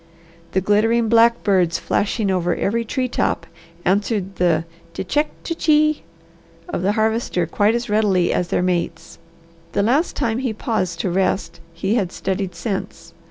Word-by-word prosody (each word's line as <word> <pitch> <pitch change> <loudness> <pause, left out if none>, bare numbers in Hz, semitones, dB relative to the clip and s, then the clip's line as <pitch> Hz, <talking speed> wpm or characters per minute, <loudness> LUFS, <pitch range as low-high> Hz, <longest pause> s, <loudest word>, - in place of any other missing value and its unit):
The 190 - +2
glittering 220 +4 +2
black 235 +1 +4
birds 180 -5 +2
flashing 205 -1 0
over 175 -2 +1
every 230 +3 0
tree 255 +3 -1
top 170 -7 -1 0.4
answered 195 0 0
the 165 -2 +2 0.3
"T'check, 295 +12 0 0.2
t'chee!" 305 -2 +2 0.7
of - - -3
the 195 +3 +1
Harvester 220 -5 0
quite 205 +6 +2
as 240 0 -2
readily 205 -5 +2
as 180 - 0
their 180 - 0
mates. 180 -2 -2 0.5
The 200 - +2
last 275 - +1
time 230 0 0
he 255 -4 -1
paused 205 -7 -2
to 185 - -1
rest 185 -2 0
he 190 +5 -2
had 200 -7 0
studied 190 -1 -3
scents. 200 -5 -5
205 Hz, 150 wpm, -21 LUFS, 180-230 Hz, 0.7 s, black